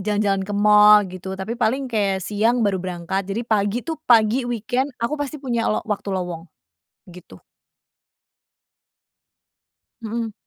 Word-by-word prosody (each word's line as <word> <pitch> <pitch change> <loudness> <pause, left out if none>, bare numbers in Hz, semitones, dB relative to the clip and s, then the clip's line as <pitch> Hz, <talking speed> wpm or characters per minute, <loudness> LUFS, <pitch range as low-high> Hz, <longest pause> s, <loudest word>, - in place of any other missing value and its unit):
jalan-jalan 205 -1 0
ke - - -3
mall 210 0 +6
gitu, 190 +1 -7
tapi 190 +4 -5
paling 255 +5 +1
kayak 195 -3 0
siang 225 +3 +1
baru 190 -3 0
berangkat 185 +2 -4
jadi 225 +5 -3
pagi 215 +1 0
tuh 325 -2 -5
pagi 235 +2 +4
weekend 245 +4 -1
aku 235 +5 -3
pasti 290 +1 -4
punya 245 -5 -2
lo - - -1
waktu 205 -1 -4
lowong. 180 -3 -4 0.6
Gitu. 180 +1 -14 2.6
Mhm. 225 0 -4
210 Hz, 130 wpm, -21 LUFS, 195-235 Hz, 2.6 s, mall